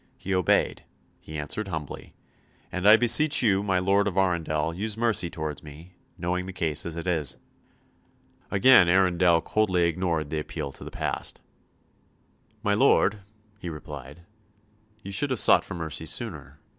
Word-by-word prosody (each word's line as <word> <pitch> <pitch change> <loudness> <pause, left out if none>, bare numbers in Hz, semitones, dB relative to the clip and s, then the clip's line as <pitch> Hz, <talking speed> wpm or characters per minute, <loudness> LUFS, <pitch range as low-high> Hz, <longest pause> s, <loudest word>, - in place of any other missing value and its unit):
He 95 - -4
obeyed, 90 -2 +1 0.4
he 80 - -9
answered 75 +8 -3
humbly; 80 -6 -7 0.6
"and 90 +3 +2
I 110 - +9
beseech 125 +5 +3
you, 100 -4 +3
my 95 -2 0
Lord 100 +3 +2
of 95 -2 -3
Arundel, 80 -4 0
use 105 +4 -3
mercy 115 -6 +1
towards 75 -3 -5
me, 80 +4 -13 0.2
knowing 90 +1 -2
the 95 - -7
case 80 -3 -2
as 80 - -6
it 85 - -6
is." 80 -6 -1 1.1
Again 100 -3 +6
Arundel 90 -2 +3
coldly 95 -5 +1
ignored 85 -3 -1
the 80 - -1
appeal 75 -2 -5
to - - -8
the - - -8
past. - - -4 1.2
"My 105 -2 +1
lord," 105 -3 +3 0.4
he 90 - -6
replied, 75 -1 -9 0.8
"ye 100 - -7
should 145 +9 -1
have 130 - -1
sought - - +5
for 95 - -8
mercy 80 -1 -3
sooner. 75 - -4
90 Hz, 155 wpm, -26 LUFS, 80-100 Hz, 1.2 s, I